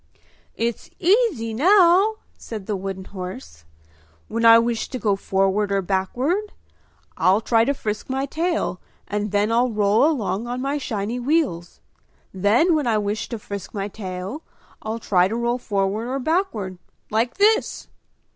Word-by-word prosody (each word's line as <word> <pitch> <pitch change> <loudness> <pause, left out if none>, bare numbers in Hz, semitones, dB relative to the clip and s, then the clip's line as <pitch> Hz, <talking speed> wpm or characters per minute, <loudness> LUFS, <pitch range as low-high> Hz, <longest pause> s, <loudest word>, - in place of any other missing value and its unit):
"It's 235 0 -3
easy 355 - +2
now!" 370 - +5 0.2
said 215 -4 -8
the 210 - -2
wooden 190 0 -5
horse. 135 - -8 0.6
"When 230 +1 -1
I 230 0 +9
wish 230 0 0
to 260 - -4
go 210 -5 +1
forward 195 +1 0
or 195 -1 +1
backward 255 - -1 0.6
I'll 190 +3 +4
try 225 0 +2
to 280 - +1
frisk 210 -2 -4
my 265 +1 -1
tail 320 - -2 0.3
and 210 0 -2
then 205 +2 +1
I'll 240 +2 +3
roll 210 +1 +3
along 230 -6 -2
on 245 +1 -3
my 275 +3 -1
shiny 225 -1 -3
wheels; 250 - -1 0.5
then 210 - +3
when 300 -5 +1
I 220 -2 +2
wish 210 +1 -2
to 235 - -4
frisk 200 -1 -8
my 200 0 -3
tail 190 +6 -6 0.4
I'll 220 +1 -3
try 185 -5 +2
to 220 - -3
roll 235 +1 0
forward 205 +1 -1
or 260 +2 -2
backward, 265 - -1 0.3
like 225 +3 0
this!" 435 +3 +2
225 Hz, 155 wpm, -22 LUFS, 200-270 Hz, 0.6 s, I